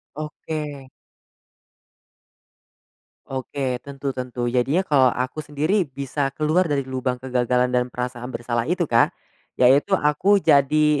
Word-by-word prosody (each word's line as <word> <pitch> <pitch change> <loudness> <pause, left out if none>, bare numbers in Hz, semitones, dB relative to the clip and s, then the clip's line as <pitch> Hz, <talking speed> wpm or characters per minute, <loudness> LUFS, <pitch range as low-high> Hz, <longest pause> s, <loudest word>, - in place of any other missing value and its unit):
Oke. 150 -2 -6 2.4
Oke, 130 -1 -3
tentu 140 0 -5
tentu. 125 -2 -3
Jadinya 130 +8 +1
kalau 140 -8 +3
aku 130 +5 -4
sendiri 155 +7 0
bisa 140 0 -3
keluar 155 +5 +2
dari 145 -4 0
lubang 130 -1 -3
kegagalan 125 -1 +1
dan 125 0 +1
perasaan 125 0 -5
bersalah 120 0 -2
itu 175 +1 -1
Kak, 115 0 +3 0.5
yaitu 135 +9 +5
aku 190 +5 +3
jadi, 145 +1 +4
135 Hz, 115 wpm, -22 LUFS, 125-150 Hz, 2.4 s, yaitu